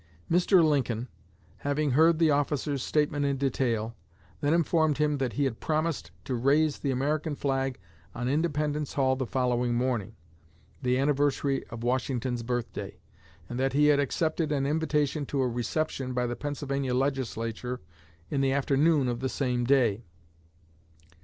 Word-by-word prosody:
Mr. 180 +1 +5
Lincoln, 125 -5 0 0.5
having 145 0 0
heard 160 +5 +5
the 160 -2 +4
officer's 145 -1 0
statement 150 +1 0
in 140 -1 +1
detail, 120 -4 -1 0.4
then 145 - +1
informed 160 -2 +2
him 150 -1 +1
that 130 -3 -1
he 145 - 0
had 130 -5 -1
promised 155 - -1 0.2
to 130 - -3
raise 140 +5 +2
the 140 - -2
American 145 +4 0
flag 135 -2 -1 0.4
on 120 +1 -2
Independence 150 0 0
Hall 130 -2 +2
the 130 -1 -3
following 125 -1 0
morning 120 -4 -1 0.7
the 125 -1 +1
anniversary 140 0 +1
of 115 0 -8
Washington's 125 -1 -1
birthday 120 0 -4 0.5
and 120 - -5
that 135 0 +1
he 150 +1 +4
had 145 - +2
accepted 155 +2 0
an 140 -2 +1
invitation 150 -1 0
to 140 - -2
a 130 - +2
reception 130 +2 -2
by 125 0 +1
the 120 0 -2
Pennsylvania 140 -2 -2
Legislature 125 -2 -2 0.5
in 140 - +1
the 135 -1 +2
afternoon 140 +1 +2
of 120 -1 -2
the 130 +1 -1
same 125 -3 -1
day. 120 -5 +3
135 Hz, 150 wpm, -28 LUFS, 125-150 Hz, 0.7 s, Mr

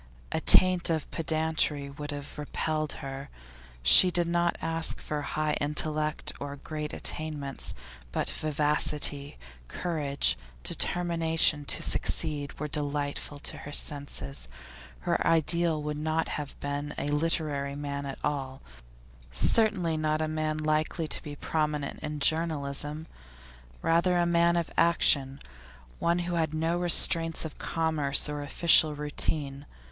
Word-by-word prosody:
A - - -2
taint 185 -2 +6
of 160 -3 -2
pedantry 155 -3 0
would 145 +1 -8
have 145 0 -7
repelled 155 +1 -2
her. 135 +1 -7 0.5
She 180 - +9
did 175 -1 +1
not 170 0 0
ask 165 0 +1
for 150 -1 -4
high 155 +1 -2
intellect 150 +1 -1
or 140 0 -6
great 150 +1 -6
attainments; 150 -3 -2 0.4
but - - -2
vivacity, 150 -1 0 0.3
courage, 140 - -1 0.2
determination 165 -4 +1
to - - 0
succeed, 150 -3 +1
were 150 - -3
delightful 145 0 -3
to - - -3
her 145 - -9
senses. 75 - -2 0.5
Her - - -1
ideal 165 0 +3
would 150 0 -4
not 160 +1 -1
have 145 -2 -6
been 145 +1 -4
a 145 - -3
literary 145 -2 0
man 140 -1 -5
at 135 - -6
all; 135 -2 -3 0.7
certainly 175 - +1
not 155 0 0
a 155 - -1
man 155 0 -2
likely 155 +1 -1
to - - 0
be 145 -1 -8
prominent 150 -2 -3
in 150 -1 -5
journalism; 150 -1 -1 0.8
rather 170 +2 +2
a 175 - +2
man 170 0 +2
of 170 - -2
action, 140 -5 +3 0.6
one 170 +1 +1
who 175 - -3
had 160 -2 -1
no 165 +2 -1
restraints 165 -2 +3
of 155 - -9
commerce 155 -4 +3
or 150 0 -4
official 155 +1 +4
routine. 145 -1 -2
150 Hz, 130 wpm, -28 LUFS, 145-165 Hz, 0.8 s, She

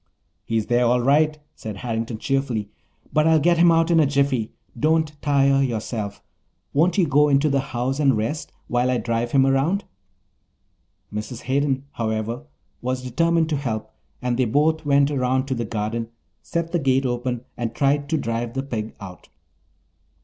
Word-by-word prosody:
"He's 110 -2 0
there, 120 0 +2
all 125 +1 +3
right," 150 +4 +3 0.2
said 110 -3 -7
Harrington 115 +1 -3
cheerfully, 125 -5 -1 0.4
"but 155 +1 +3
I'll 160 0 +5
get 170 +2 +3
him 170 0 +6
out 165 +1 +3
in 165 - +5
a 150 - +4
jiffy. 140 -5 +1 0.2
Don't 155 0 +1
tire 140 -2 +3
yourself. 110 -4 -3 0.5
Won't 170 +5 +2
you 185 - +4
go 145 0 +4
into 140 +2 +3
the 140 - +2
house 130 0 -2
and 135 -6 +3
rest 115 +9 -3 0.2
while 125 +1 +1
I 125 - +2
drive 120 0 -1
him 135 -1 +4
around?" 140 +9 +1 1.3
Mrs. 110 +3 -5
Hayden, 135 +1 0
however, 115 +4 -3 0.4
was 125 +1 -2
determined 165 +6 +1
to 150 - 0
help 115 -6 -4 0.3
and 125 -1 0
they 130 - +2
both 150 +6 +1
went 140 0 +4
around 130 -1 +1
to - - +1
the 120 -2 -2
garden, 110 +1 -3 0.3
set 170 0 -3
the 175 - +1
gate 135 -2 +2
open, 120 -1 -2
and 115 -2 -4
tried 140 0 +1
to 160 - +1
drive 115 -1 -3
the 135 - -1
pig 115 -5 -5
out. 95 -2 -11
135 Hz, 170 wpm, -23 LUFS, 115-145 Hz, 1.3 s, him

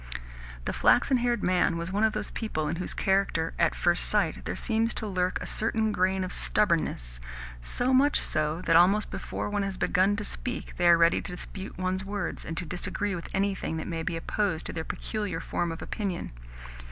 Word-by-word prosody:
The - - -1
flaxen 265 - +4
haired 240 0 0
man 180 -1 +2
was 170 +2 -4
one 205 +3 +1
of 220 -1 +3
those 210 -1 -4
people 155 -9 -2
in 165 +2 -2
whose 180 - -3
character, 190 -4 +1
at - - +3
first 175 0 +2
sight, - - +1
there - - -2
seems 225 0 0
to 220 - -2
lurk 185 -2 0
a - - -6
certain 220 0 +1
grain 190 -1 +1
of 185 - -4
stubbornness 160 - 0 0.4
so 245 - +1
much 280 +3 +5
so 155 +3 +1
that, 165 - +3
almost 195 +5 +5
before - - -4
one 205 0 -1
has 195 -1 -3
begun 195 +2 +2
to 205 - -3
speak, 245 +4 -3
they 175 - +3
are 170 -1 +8
ready 165 0 +4
to - - -7
dispute 190 +2 -6
one's 185 +1 -1
words, 200 +1 -4
and 165 - -5
to 175 - -2
disagree 195 +4 -2
with 170 -1 -6
anything 195 -4 -1
that 160 - -4
may 165 -2 -3
be 165 +1 -2
opposed 175 -1 -1
to - - -3
their 160 - -3
peculiar 205 -1 -3
form 170 +1 -2
of 165 - -6
opinion. 195 -5 -3
185 Hz, 200 wpm, -28 LUFS, 170-210 Hz, 0.4 s, are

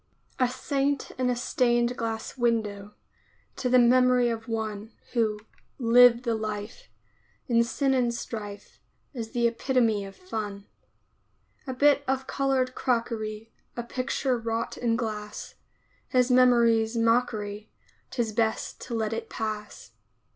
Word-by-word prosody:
A 255 -1 +3
Saint 275 +2 -1
in 255 -1 +2
a 250 - +1
stained 240 0 +1
glass 225 -1 -4
window, 210 -4 -1 0.6
To 250 - -1
the 255 - +5
memory 250 0 +5
of 225 0 -5
one 220 -1 -4 0.2
Who 220 -3 +1 0.4
"lived 245 0 +6
the 235 -2 0
life," 215 - -5 0.6
In 235 -2 +3
sin 270 +3 0
and 245 -2 +2
strife, 210 -3 -7 0.3
Is 230 -4 -5
the 240 -1 +1
epitome 230 -3 +1
of 195 - -10
fun. 210 - -6 1.0
A 260 - -2
bit 285 +1 +4
of 265 0 0
colored 265 -2 0
crockery, 225 -3 -2 0.3
A 240 - -2
picture 255 +1 -1
wrought 225 0 -3
in 235 -2 0
glass, 215 -3 -5 0.5
His 255 -1 +2
memory's 235 -2 +4
mockery 220 -3 0 0.4
'Tis 235 -4 -2
best 220 0 -1
to 240 - -3
let 220 -1 -1
it 225 - -5
pass. 215 -1 -5
235 Hz, 130 wpm, -27 LUFS, 220-250 Hz, 1.0 s, lived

